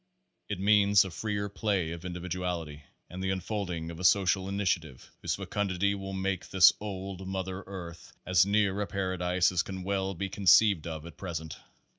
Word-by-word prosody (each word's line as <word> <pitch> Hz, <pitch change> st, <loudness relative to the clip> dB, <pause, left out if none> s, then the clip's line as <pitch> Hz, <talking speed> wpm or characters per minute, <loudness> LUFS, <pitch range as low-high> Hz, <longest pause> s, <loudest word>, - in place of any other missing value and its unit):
It 100 Hz, -3 st, -3 dB
means 100 Hz, 0 st, +5 dB
a 95 Hz, -, -6 dB
freer 100 Hz, +5 st, -2 dB
play 100 Hz, -4 st, -1 dB
of 85 Hz, +1 st, -7 dB
individuality, 90 Hz, -4 st, -4 dB, 0.2 s
and 90 Hz, +1 st, -8 dB
the 95 Hz, -, 0 dB
unfolding 95 Hz, -3 st, -3 dB
of 85 Hz, -, -9 dB
a -, -, -6 dB
social 95 Hz, 0 st, +3 dB
initiative 90 Hz, -9 st, -2 dB
whose -, -, -1 dB
fecundity 100 Hz, -1 st, -1 dB
will 95 Hz, -1 st, -5 dB
make 95 Hz, -1 st, -2 dB
this 95 Hz, -1 st, +7 dB
old 95 Hz, -2 st, -6 dB
Mother 95 Hz, 0 st, -4 dB
Earth 85 Hz, -3 st, -9 dB
as 90 Hz, -2 st, +5 dB
near 100 Hz, 0 st, +1 dB
a 100 Hz, -, -2 dB
paradise 90 Hz, -2 st, 0 dB
as 90 Hz, -2 st, +2 dB
can 95 Hz, 0 st, -6 dB
well 95 Hz, 0 st, -1 dB
be 95 Hz, +3 st, -3 dB
conceived 95 Hz, -2 st, +4 dB
of 80 Hz, -1 st, -6 dB
at 85 Hz, -3 st, -11 dB
present. 80 Hz, -4 st, -5 dB
95 Hz, 170 wpm, -29 LUFS, 90-100 Hz, 0.2 s, this